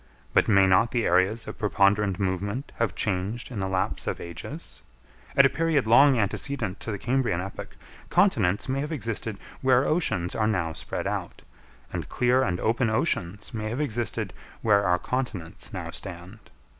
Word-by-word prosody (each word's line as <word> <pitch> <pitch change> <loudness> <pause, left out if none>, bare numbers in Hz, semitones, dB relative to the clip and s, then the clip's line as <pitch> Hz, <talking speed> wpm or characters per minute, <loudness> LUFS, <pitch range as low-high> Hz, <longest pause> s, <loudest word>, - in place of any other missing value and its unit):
But - - +4
may 100 -3 +5
not 95 +5 +4
the 120 -2 0
areas 95 +6 +2
of - - -7
preponderant 100 -1 +2
movement 100 +7 -2
have 115 - 0
changed 100 +5 -2
in 110 - -4
the 95 - -1
lapse 95 0 -1
of - - -2
ages? 85 -1 -8 0.6
At - - +8
a - - +6
period 160 -5 +1
long 135 +4 +6
antecedent 110 0 -1
to - - -5
the 100 - -3
Cambrian 120 -6 0
epoch, 95 +2 -7 0.3
continents 125 - +2
may 135 +1 -1
have 150 +3 -3
existed 115 -6 -3 0.2
where 130 0 +4
oceans 120 - 0
are 110 -1 +1
now 85 -7 0
spread - - -4
out, - - -4 0.5
and - - -4
clear 125 +1 +2
and 90 -8 0
open 115 +1 +1
oceans 105 - -1
may 110 -1 -3
have 120 +5 -3
existed 120 -5 -1 0.3
where 100 -2 +4
our 90 0 +3
continents 105 -7 -4
now - - -5
stand. 90 +5 -6
110 Hz, 170 wpm, -26 LUFS, 95-125 Hz, 0.6 s, At